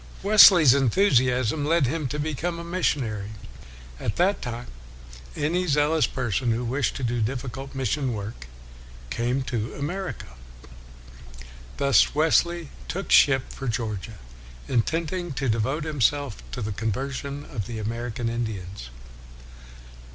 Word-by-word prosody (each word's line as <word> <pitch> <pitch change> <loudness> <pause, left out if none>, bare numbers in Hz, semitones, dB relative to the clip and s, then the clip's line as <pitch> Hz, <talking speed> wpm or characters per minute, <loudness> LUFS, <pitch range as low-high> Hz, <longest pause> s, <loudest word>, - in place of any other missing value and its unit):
Wesley's 190 - +8
enthusiasm 130 - +2
led 160 0 +3
him 150 +3 -1
to 145 - -4
become 155 +3 -2
a 170 - -6
missionary. 120 - -1 0.7
At 105 - -2
that 190 +4 +2
time, 120 -1 -5 0.7
any 175 +5 0
zealous 150 +1 +3
person 125 -1 -1
who 115 +2 0
wished 130 +1 -1
to 135 - -5
do 120 0 0
difficult 130 +3 -4
mission 135 +1 -1
work 100 - -7 0.6
came 125 - -1
to 115 -3 -3
America. 175 - -5 1.5
Thus 140 0 +3
Wesley 165 +1 +2 0.2
took 195 +3 -4
ship 135 -3 +5
for 135 - -6
Georgia, 110 -2 -3 0.5
intending 165 +7 -1
to 135 0 -2
devote 120 +8 0
him 150 -4 -4
self 140 - +1
to - - -4
the 105 - -3
conversion 135 +7 -4
of 110 -7 -5
the 120 -2 -5
American 115 +2 -3
Indians. 105 - -4
130 Hz, 125 wpm, -25 LUFS, 115-150 Hz, 1.5 s, Wesley's